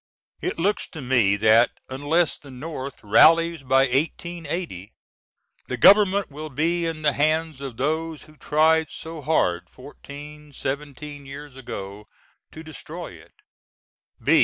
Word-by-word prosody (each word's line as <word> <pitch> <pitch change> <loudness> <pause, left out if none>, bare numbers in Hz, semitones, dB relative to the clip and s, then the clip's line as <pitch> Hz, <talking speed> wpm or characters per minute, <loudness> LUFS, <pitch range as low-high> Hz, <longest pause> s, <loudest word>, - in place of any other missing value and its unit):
It - - -2
looks 200 +5 0
to 160 - -10
me 120 -6 +3
that 110 +3 +4
unless 145 +5 +1
the 145 - -14
North 135 0 -7
rallies 165 +9 +5
by 135 0 +3
1880 150 - -2 0.7
the 130 - -3
Government 200 - +5
will 155 +2 -7
be 165 +5 0
in 160 -1 -5
the 150 -1 +3
hands 155 -1 0
of 135 -4 -6
those 160 +3 -2
who 155 - -18
tried 155 +2 +2
so 160 -1 -8
hard 90 - 0
fourteen 145 +2 -12
seventeen 145 +1 -6
years 140 0 -9
ago 105 -5 -8 0.4
to 160 - -10
destroy 155 -2 -8
it. - - -17
150 Hz, 130 wpm, -24 LUFS, 130-160 Hz, 0.7 s, rallies